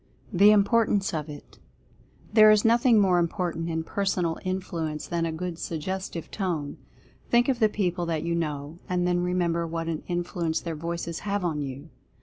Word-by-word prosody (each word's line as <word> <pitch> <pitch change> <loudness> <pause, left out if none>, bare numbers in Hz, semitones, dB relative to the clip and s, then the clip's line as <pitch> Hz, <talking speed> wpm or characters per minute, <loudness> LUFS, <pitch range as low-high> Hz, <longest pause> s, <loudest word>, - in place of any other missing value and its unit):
THE 200 +3 +7
IMPORTANCE 205 -1 +3
OF 155 -1 -3
IT. 145 -1 -11 0.7
There 215 -1 +8
is 215 0 +5
nothing 235 0 +5
more 185 -3 +4
important 170 -1 -2
in 160 0 -2
Personal 180 -3 -1
Influ 180 -4 -3
ence 150 - -6
than 170 -1 -1
a - - -2
good 170 +1 -5
Suggestive 170 +1 -4
Tone. 170 -8 -3 0.5
Think 240 0 +4
of 260 -3 +1
the 220 -2 +4
people 180 -4 -1
that 160 -2 -1
you 170 0 -1
know, 155 -1 -3
and 180 -1 +1
then 180 0 +1
remember 175 -2 0
what 165 0 -4
an 160 -2 -2
influence 175 -2 -1
their 165 -2 -5
voices 170 +1 -4
have 200 -2 -2
on 155 -4 -1
you. 140 +3 -7
175 Hz, 175 wpm, -26 LUFS, 165-195 Hz, 0.7 s, There